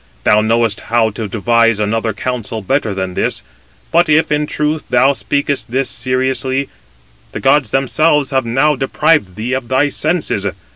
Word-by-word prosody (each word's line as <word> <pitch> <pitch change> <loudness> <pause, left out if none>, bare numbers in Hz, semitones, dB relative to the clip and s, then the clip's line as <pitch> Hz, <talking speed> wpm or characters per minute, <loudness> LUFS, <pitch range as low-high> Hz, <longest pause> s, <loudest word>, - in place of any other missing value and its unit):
Thou 105 - +4
knowest 115 -1 +1
how 115 -1 +2
to 110 +1 -5
devise 115 +1 +2
another 110 +2 0
counsel 115 -1 -4
better 110 -2 -1
than 95 -1 -3
this; - - -2 0.5
but 170 0 +3
if, 155 +1 +3
in 150 0 +1
truth, 150 +1 -1
thou 130 +3 +4
speakest 140 -3 -2
this 130 +3 -1
seriously, 130 +2 -1 0.6
the - - -4
gods 135 -3 +2
themselves 145 +2 +1
have 130 -1 +1
now 135 +6 +1
deprived 135 - +1
thee 115 +5 -3
of 130 -2 -3
thy 130 +4 +2
senses. 155 - -1
130 Hz, 155 wpm, -15 LUFS, 115-145 Hz, 0.6 s, Thou